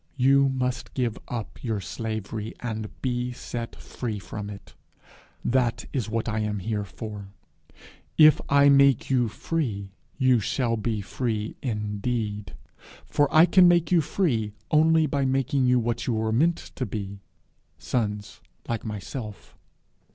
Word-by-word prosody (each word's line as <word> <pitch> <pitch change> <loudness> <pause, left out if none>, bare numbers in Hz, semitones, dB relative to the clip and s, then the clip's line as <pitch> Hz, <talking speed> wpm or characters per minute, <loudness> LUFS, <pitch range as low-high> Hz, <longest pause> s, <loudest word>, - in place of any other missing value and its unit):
You 135 +1 +5
must 125 -2 -2
give 120 -5 -1
up 115 -3 -6
your 110 -4 -1
slavery, 110 +1 -5
and 110 -3 -4
be 125 -1 -1
set 120 -1 -6
free 115 -4 -5
from 100 +2 -6
it. 100 -1 -10 0.7
That 125 -2 +1
is 120 -5 -1
what 115 +1 -1
I 110 -1 -1
am 105 -1 -1
here 105 +2 -2
for. 105 -1 -7 0.9
If 155 -1 +7
I 140 0 +6
make 140 -2 +5
you 125 -3 +3
free, 110 -6 -3 0.3
you 130 -3 +4
shall 115 +2 0
be 110 -1 -2
free 110 0 -3
indeed; 105 -2 -3 0.5
for 145 -1 +1
I 160 +2 +8
can 180 0 +6
make 170 -1 +3
you 175 -2 +5
free 120 - 0 0.2
only 160 +1 +5
by 140 -1 0
making 135 0 +1
you 125 0 +4
what 120 0 -2
you 125 - +1
were 110 0 0
meant 165 +9 +1
to 130 - -2
be, 100 -1 -5 0.6
sons 105 +3 -3 0.3
like 115 -2 -2
myself. 105 +1 -7
120 Hz, 145 wpm, -26 LUFS, 105-135 Hz, 0.9 s, I